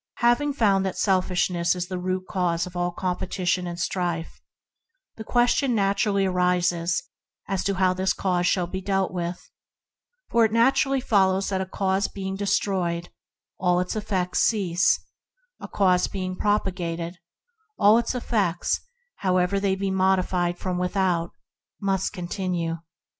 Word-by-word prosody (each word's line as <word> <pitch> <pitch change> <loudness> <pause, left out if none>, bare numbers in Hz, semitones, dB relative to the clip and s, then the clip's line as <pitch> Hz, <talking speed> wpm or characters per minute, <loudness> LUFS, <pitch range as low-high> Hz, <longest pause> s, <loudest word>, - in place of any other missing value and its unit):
Having 240 +5 +3
found 200 -7 +3
that 190 -1 -3
selfishness 180 -2 +1
is 180 0 -3
the 185 -1 -4
root 185 +1 -2
cause 175 -3 0
of 180 0 -11
all 175 0 0
competition 180 0 -2
and 175 0 -6
strife 175 -2 -2 0.7
the 220 - -7
question 245 +2 +2
naturally 200 0 +1
arises 180 -2 +1 0.4
how 190 -1 +1
this 190 +1 0
cause 180 -2 0
shall 180 -1 +2
be 190 +2 -5
dealt 195 -1 0
with, 175 0 -5 0.8
for 235 0 +4
it 220 - +3
naturally 270 +4 +3
follows 195 -5 +2
that 190 -1 -1
a 190 - -3
cause 190 +1 0
being 190 -1 -5
destroyed, 190 -4 -1 0.5
all 180 -1 +2
its 180 +3 -2
effects 195 -4 -1
cease; 180 -5 +2 0.6
a - - -7
cause 185 -3 +2
being 185 -1 -4
propagated, 175 -4 -1 0.6
all 210 +3 +6
its 235 +2 -2
effects, 200 -8 0 0.4
however 185 +1 +1
they 195 -1 +1
may 190 - -9
be 195 -1 0
modified 185 -2 +1
from 180 -1 -3
without, 180 -2 0 0.5
must 195 -2 0
continue. 175 -2 -3
185 Hz, 135 wpm, -25 LUFS, 180-200 Hz, 0.8 s, all